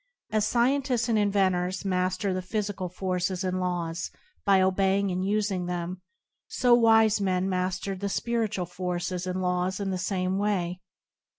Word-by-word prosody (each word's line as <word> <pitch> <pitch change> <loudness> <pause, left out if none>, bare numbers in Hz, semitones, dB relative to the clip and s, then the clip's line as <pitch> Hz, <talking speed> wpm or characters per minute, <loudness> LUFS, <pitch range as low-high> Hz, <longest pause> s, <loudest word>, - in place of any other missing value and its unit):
As 215 -1 +2
scientists 250 0 +1
and 220 -2 +3
inventors 190 -2 +1
mas 185 -1 0
ter 195 0 -1
the 185 - -2
physical 200 -1 -3
forces 180 0 -2
and 185 0 -1
laws 170 -2 -2 0.3
by 195 -1 +5
obeying 190 +1 +2
and 180 +1 -1
using 200 -3 0
them, 180 +1 -4 0.5
so 245 -2 +3
wise 225 -2 +5
men 185 -1 +1
master 185 +1 -1
the 200 +2 -3
spiritual 220 -4 -1
forces 180 0 -3
and 185 0 -2
laws 180 +1 0
in 195 -1 -2
the 185 - -2
same 185 0 -1
way. 180 -3 -1
185 Hz, 155 wpm, -27 LUFS, 180-205 Hz, 0.5 s, by